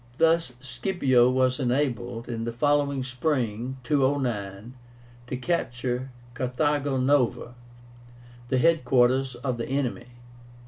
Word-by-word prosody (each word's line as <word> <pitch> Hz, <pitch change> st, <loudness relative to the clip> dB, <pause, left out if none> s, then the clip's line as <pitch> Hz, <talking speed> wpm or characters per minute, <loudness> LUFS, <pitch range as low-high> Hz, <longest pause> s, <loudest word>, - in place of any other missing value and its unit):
Thus 165 Hz, -5 st, +3 dB
Scipio 130 Hz, -4 st, +2 dB
was 130 Hz, 0 st, +1 dB
enabled, 120 Hz, -3 st, -1 dB
in 115 Hz, -2 st, -4 dB
the 115 Hz, -, -2 dB
following 140 Hz, +1 st, +1 dB
spring 130 Hz, -2 st, -2 dB
(209), 120 Hz, -6 st, -1 dB, 0.5 s
to 130 Hz, -, -3 dB
capture 125 Hz, -4 st, -2 dB, 0.2 s
Carthago 135 Hz, +3 st, 0 dB
Nova, 130 Hz, -2 st, +1 dB, 1.0 s
the 130 Hz, -, +2 dB
head 165 Hz, +2 st, +3 dB
quarters 130 Hz, +1 st, +2 dB
of 125 Hz, -1 st, -3 dB
the 115 Hz, -, -4 dB
enemy. 130 Hz, -3 st, -2 dB
130 Hz, 105 wpm, -26 LUFS, 120-140 Hz, 1.0 s, Thus